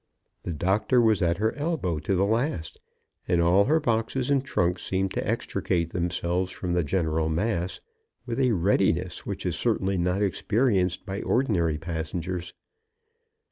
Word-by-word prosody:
The 90 - -4
doctor 95 - +2
was 110 -4 +3
at 85 -1 +2
her 110 +2 +1
elbow 145 - -1
to 85 +6 -1
the 95 +2 +2
last; 110 - -1 0.5
and 90 -1 +2
all 90 +4 +4
her 155 +4 +3
boxes 125 +1 0
and 135 -2 +3
trunks 90 -9 0
seemed 95 0 -1
to - - -2
extricate 85 -2 -1
themselves 90 +1 -1
from 90 -1 -3
the 90 -1 +2
general 80 -1 0
mass 90 +1 -1 0.5
with 120 0 -3
a 125 -3 +3
readiness 95 +1 +1
which - - -4
is - - 0
certainly 95 -1 0
not 90 +3 +1
experienced 100 -2 +1
by 100 -1 -4
ordinary 90 - +1
passengers. 85 +2 -4
95 Hz, 150 wpm, -26 LUFS, 85-110 Hz, 0.5 s, all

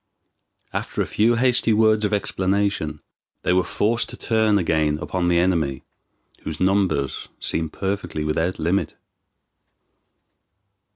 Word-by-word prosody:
After - - -2
a - - -4
few 115 +3 +2
hasty 120 -2 +2
words 110 0 +3
of 105 - -1
explanation 100 -6 -1 0.4
they - - +2
were 90 0 +3
forced 115 +6 0
to - - -8
turn 110 -2 +2
again 80 -4 +1
upon 90 +2 -2
the 85 -1 +3
enemy, 80 -7 +1 0.6
whose 80 - -6
numbers 95 -8 +1
seemed 80 -1 -2
perfectly 95 -5 -3
without 80 +4 -1
limit. 90 +5 -1
95 Hz, 120 wpm, -22 LUFS, 80-105 Hz, 0.6 s, words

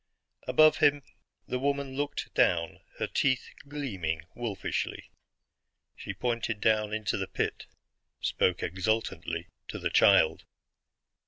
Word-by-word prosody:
Above 155 +4 +6
him 145 -1 +3 0.4
the 125 - -2
woman 140 0 -1
looked 145 +1 -3
down, 85 -2 +2 0.2
her - - -1
teeth 130 -2 0 0.2
gleaming 95 - -3
wolfishly. 115 -5 -3 0.8
She - - -6
pointed 115 -3 -2
down 105 0 +2
into 110 -1 -1
the 95 -1 -3
pit; - - -3 0.5
spoke 90 -1 +1
exultantly 110 +6 -1 0.2
to - - -5
the - - -2
child. 80 - +5
115 Hz, 110 wpm, -29 LUFS, 95-140 Hz, 0.8 s, Above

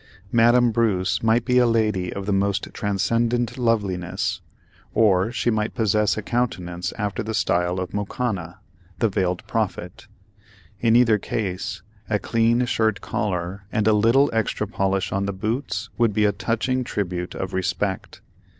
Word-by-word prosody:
Madame 120 +1 +5
Bruce 100 -5 +1
might 115 +1 +2
be 125 -1 +4
a 125 - +4
lady 105 -6 +1
of 100 - -5
the 100 - 0
most 100 0 0
transcendent 115 +4 0
loveliness, 100 -3 -1 0.5
or 100 -1 +3
she 120 0 0
might 110 0 -1
possess 105 -2 +2
a 110 - -3
countenance 90 -8 -2
after 105 +1 -2
the 110 0 -3
style 90 -4 +1
of 90 -1 -5
Mokanna, 100 -4 -3 0.4
the 115 - +2
Veiled 90 -2 -1
Prophet; - - -3 0.7
in 115 -1 +3
either 115 -3 +5
case, 95 -3 -3 0.3
a 105 - +2
clean 115 +3 +2
shirt 110 -3 +1
collar 95 0 -3
and 110 -3 +1
a 110 - +5
little 115 +7 +4
extra 110 -1 0
polish 95 -3 -1
on 100 +1 -1
the - - -1
boots 110 +1 -3
would 115 -3 +3
be 105 +1 +2
a 105 - +4
touching 120 +5 -1
tribute 90 -6 -3
of 95 +1 -4
respect. 95 +1 -2
105 Hz, 150 wpm, -23 LUFS, 95-115 Hz, 0.7 s, Madame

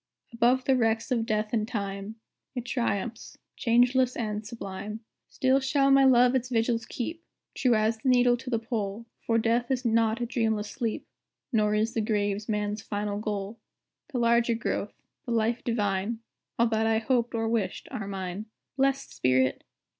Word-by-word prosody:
Above 245 +2 +3
the 265 - +4
wrecks 225 0 +1
of 230 -2 +1
Death 215 0 -1
and 215 -2 +1
Time, 200 -1 -4 0.4
It 245 -1 -4
triumphs, 235 -2 -2 0.2
changeless 250 +2 +3
and 215 -2 -3
sublime. 210 -1 -6 0.3
"Still 260 +1 +2
shall 275 +1 +2
my 275 0 +6
love 250 -1 +6
its 255 -1 0
vigils 230 -1 0
keep, 325 +7 -5 0.3
True 250 -3 +2
as 220 +1 +1
the 260 - 0
needle 245 -1 +5
to 255 +1 -8
the 235 - +1
pole, 225 -2 -3
For 230 - 0
Death 230 +2 +1
is 260 -1 -1
not 225 0 +2
a 240 - -1
dreamless 220 -3 -1
sleep, 230 -4 -3 0.5
Nor 210 -1 +3
is 220 +2 +1
the 225 - 0
Grave 205 -1 -1
man's 210 0 -1
final 205 -1 -3
goal. 210 0 -4 0.5
The 265 - -2
larger 235 0 +3
growth, 230 - -3 0.3
the 240 - -1
life 230 +1 +1
divine, 210 -1 -1 0.4
All 235 - +4
that 220 0 +1
I 225 0 +3
hoped 235 +1 0
or 225 0 0
wished, 225 -4 -1
are 200 - -4
mine." 195 +1 -5 0.3
Blest 275 0 +1
spirit! 130 0 +1
230 Hz, 170 wpm, -28 LUFS, 210-245 Hz, 0.5 s, my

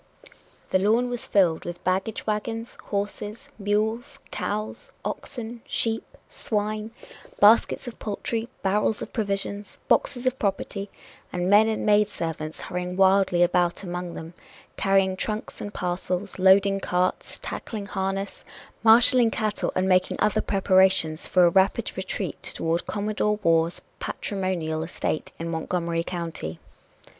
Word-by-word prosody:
The 185 - +4
lawn 230 +5 +2
was 245 - -5
filled 175 -5 +3
with 175 0 -7
baggage 190 +4 -1
wagons, 225 +2 -3
horses, 210 +5 -4
mules, 220 +7 -1
cows, 215 +1 -4
oxen, 235 -1 -5
sheep, 225 -5 -1
swine, 215 0 -2 0.5
baskets 220 +4 +5
of 245 - -8
poultry, 225 +2 -3
barrels 205 +2 +1
of - - -10
provisions, 200 -1 -3
boxes 250 -2 +1
of 255 0 0
property, 200 0 -2 0.4
and 180 +1 -1
men 210 +2 +7
and 220 -1 -1
maid 210 0 +4
servants 160 -4 -5
hurrying 180 0 -4
wildly 190 -2 +4
about 175 +1 +1
among 175 -1 -5
them, 165 +2 -8 0.4
carrying 195 -1 +2
trunks 215 +3 -4
and 205 - -5
parcels, 180 +1 -3
loading 195 +1 +5
carts, 180 -1 -1
tackling 210 -3 -5
harness, 195 0 -3 0.4
marshaling 230 +1 +6
cattle 215 -2 -1
and 185 +1 +1
making 185 -1 +3
other 210 -1 +2
preparations 190 -4 +3
for 180 -1 +5
a - - +6
rapid 195 +5 +2
retreat 190 -2 -4
toward 165 +1 -1
Commodore 210 0 0
Waugh's 165 0 +2 0.2
patrimonial 180 -5 -2
estate 160 -1 -3
in 165 - -4
Montgomery 170 0 -1
County. 165 - -5
195 Hz, 130 wpm, -25 LUFS, 180-215 Hz, 0.5 s, men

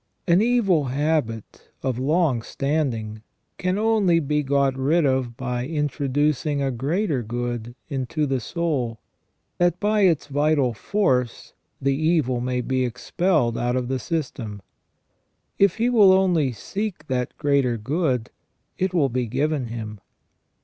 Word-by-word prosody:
An 175 +2 +5
evil 210 - +2
habit 135 -5 -2
of 130 -2 -1
long 145 -2 +2
standing 120 -6 -2 0.4
can 185 +1 0
only 210 -6 +3
be 150 -1 0
got 140 -1 +1
rid 150 +5 +2
of 130 -3 0
by 125 -2 -2
in 150 +3 -1
troducing 145 +1 0
a 135 -1 0
greater 145 - -1
good 120 +1 -4
into 140 +3 -2
the 135 -2 0
soul, 130 -5 -2 0.6
that 175 0 +2
by 210 0 +2
its 175 -6 +3
vital 145 -3 +1
force 125 - -1 0.3
the 135 +1 +1
evil 150 -5 +1
may 125 0 -1
be 130 +1 0
expelled 125 +1 0
out 120 +1 0
of 125 -1 -2
the 130 -1 -1
system. 120 - -4 1.0
If 200 -3 +4
he 230 +2 +1
will 210 -6 +6
only 175 -8 +3
seek 190 - -5
that 125 -3 -2
greater 140 -5 +1
good, 130 0 -1 0.5
it 185 0 0
will 145 -5 +3
be 125 0 -1
given 145 +2 -1
him. 110 -2 -6
140 Hz, 140 wpm, -23 LUFS, 125-165 Hz, 1.0 s, will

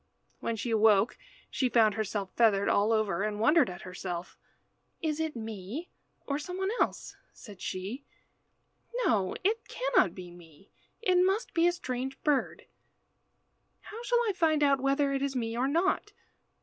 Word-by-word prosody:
When 230 - -2
she 230 +2 -3
awoke 215 0 +4 0.4
she 255 - +1
found 225 -3 +4
herself 205 -2 -3
feathered 205 -4 +3
all 205 +2 +3
over, 215 -5 +1
and 210 0 -2
wondered 280 - +4
at 180 0 -8
herself. 180 -1 -6 0.6
"Is 315 -1 -2
it 320 -3 -2
me 220 - -6 0.3
or 280 0 -2
some 360 +4 -6
one 385 +1 -1
else?" - - -1 0.2
said 205 -5 -13
she. 200 +9 -5 1.0
"No, 195 -5 +1
it 440 +4 0
cannot - - +1
be 180 -2 -9
me. 170 +1 -17 0.3
It 365 -4 +4
must 390 +5 0
be 335 0 +4
a - - +4
strange 265 -6 -4
bird. 295 -3 0 1.2
How 445 +2 -9
shall 485 0 +2
I 415 - +1
find 315 -4 +2
out 275 -2 +3
whether 275 +1 +2
it 270 - -1
is 275 -1 -1
me 230 -2 -2
or 250 +3 +1
not? 370 +7 0
250 Hz, 160 wpm, -30 LUFS, 205-320 Hz, 1.2 s, awoke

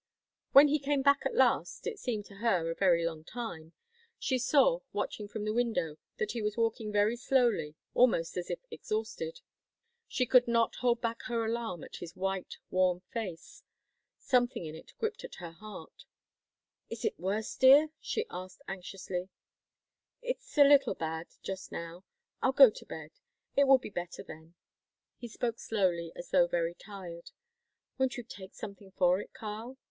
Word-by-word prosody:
When 285 +2 +9
he 300 +1 +2
came 280 0 0
back 280 0 +4
at 470 - -6
last - - +2
it 450 -3 -3
seemed 220 - -2
to 200 - -14
her 185 -7 +1
a - - -4
very 170 -3 +3
long 160 -2 -3
time 170 -7 -7 0.4
she 260 -2 0
saw, 300 - +4
watching 210 - -3
from 210 0 -5
the 215 - 0
window, 225 -10 0 0.2
that 215 - -1
he 235 - -3
was 210 +1 -2
walking 225 -2 0
very 210 +2 +3
slowly, 240 - +1 0.2
almost 225 -10 +3
as 180 -1 -4
if - - -1
exhausted 475 +3 -4 0.7
She 255 - 0
could 250 +1 +5
not 230 -1 +2
hold 240 -1 +2
back 230 -1 -2
her 230 -2 0
alarm 225 -6 -3
at - - -9
his 170 -1 -8
white, 195 0 -3
worn 185 -1 +2
face. 190 -8 -6 0.6
Something 245 -7 +1
in 155 - -6
it 160 - -12
gripped 445 +1 -3
at - - -8
her 170 -2 -8
heart. 210 +5 -11 0.8
"Is - - -5
it 440 - -1
worse, 205 +4 -2
dear?" 275 +4 +7
she 445 - -2
asked 185 +8 -8
anxiously. 185 -1 -5 0.9
"It's - - -5
a 290 - +10
little 280 -2 +5
bad 160 +1 -4 0.2
just 190 0 -5
now. 170 +3 -7 0.4
I'll 265 - +2
go 265 -4 +9
to - - -11
bed. 155 -1 -8 0.4
It 280 0 +5
will 270 0 +8
be 250 - -9
better 175 -2 -5
then." 160 +2 -12 0.6
He 240 - -6
spoke 235 0 -3
slowly, 175 -6 0
as 175 - -9
though 175 -2 +5
very 170 -1 0
tired. 175 -3 -9 0.7
"Won't 265 -1 +1
you 245 - -5
take 195 -4 -11
something 200 -2 -9
for 180 0 +3
it, - - -8
Karl?" 225 +4 -7
215 Hz, 170 wpm, -31 LUFS, 180-250 Hz, 0.9 s, a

